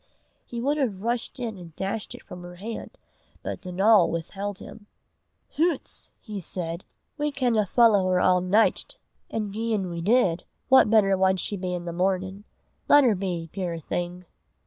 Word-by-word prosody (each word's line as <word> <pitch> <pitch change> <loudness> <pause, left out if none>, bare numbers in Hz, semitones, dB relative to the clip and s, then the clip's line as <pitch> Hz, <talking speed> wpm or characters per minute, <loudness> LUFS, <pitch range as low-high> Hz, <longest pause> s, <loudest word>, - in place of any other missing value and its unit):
He 240 - -5
would 285 +5 0
have 210 -8 -1
rushed 235 +2 -2
in 225 -5 -4
and 165 -3 -12
dashed 195 +2 -3
it - - -13
from 180 - -10
her 175 0 -10
hand, 220 +5 -7 0.5
but - - -5
Donal 190 +1 +4
withheld 195 +4 -4
him. 205 +1 -11 0.7
"Hoots!" 325 -2 -1
he 210 -3 -6
said, 170 -1 -5 0.3
"we 295 0 0
canna 240 -7 +1
follow 205 -3 +4
her 185 - +3
a' 180 0 +4
nicht; 210 - +2 0.3
an' 215 -2 -3
gien 215 -4 -1
we 170 0 -4
did, 190 -4 +2 0.3
what 265 -4 +7
better 205 -3 +4
wad 190 0 +2
she 205 - -3
be 180 -2 -3
i' - - -1
the 175 -1 -6
mornin'? 190 +2 -1 0.4
Lat 290 0 +7
her 240 -4 +4
be, 180 -4 -3
puir 180 -3 -3
thing!" 175 +3 -4
195 Hz, 170 wpm, -26 LUFS, 180-225 Hz, 0.7 s, what